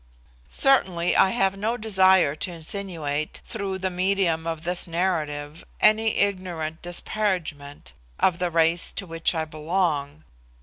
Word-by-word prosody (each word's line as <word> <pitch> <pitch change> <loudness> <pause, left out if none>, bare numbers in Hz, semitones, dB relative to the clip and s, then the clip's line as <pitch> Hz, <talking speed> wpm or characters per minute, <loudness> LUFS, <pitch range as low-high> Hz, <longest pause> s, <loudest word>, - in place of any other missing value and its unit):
Certainly 185 -11 +2
I 190 - +5
have 195 -3 +1
no 220 +4 -2
desire 190 -7 +4
to 180 +4 -4
insinuate, 160 -4 -4
through 200 -4 -4
the 190 0 -2
medium 180 -3 0
of 165 -1 -4
this 175 +1 0
narrative, 160 -4 -2 0.2
any 220 +1 +4
ignorant 180 -5 -2
disparagement 175 - -3 0.3
of 180 -2 +2
the 180 -1 0
race 165 +1 +2
to 195 - -4
which 165 0 -1
I 160 -1 -1
belong. 155 -2 -2
175 Hz, 130 wpm, -24 LUFS, 160-190 Hz, 0.3 s, I